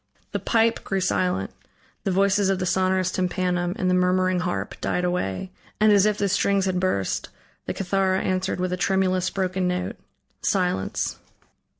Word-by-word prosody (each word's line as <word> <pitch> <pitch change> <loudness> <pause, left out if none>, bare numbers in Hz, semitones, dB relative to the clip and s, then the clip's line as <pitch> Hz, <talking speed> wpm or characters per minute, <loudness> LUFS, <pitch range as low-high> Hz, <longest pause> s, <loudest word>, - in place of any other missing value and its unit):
The - - -2
pipe 230 0 +2
grew 195 - -1
silent; 180 - 0 0.5
the 195 - +1
voices 195 +1 +3
of 195 - +2
the 185 - -2
sonorous 185 0 +1
tympanum 180 -1 -1
and 185 - 0
the 180 - +3
murmuring 185 0 +2
harp 180 0 -2
died 180 - 0
away; 180 - -2 0.3
and 215 0 +5
as 205 0 +5
if 210 -1 +1
the 200 - +1
strings 195 0 +2
had 185 -1 0
burst, 140 - -1 0.4
the - - -1
cithara 190 0 +1
answered 185 0 -1
with 180 0 -1
a - - -1
tremulous, 185 -1 +1
broken 185 -1 -1
note. 180 0 -2 0.4
Silence. 180 - 0
185 Hz, 165 wpm, -24 LUFS, 180-195 Hz, 0.5 s, and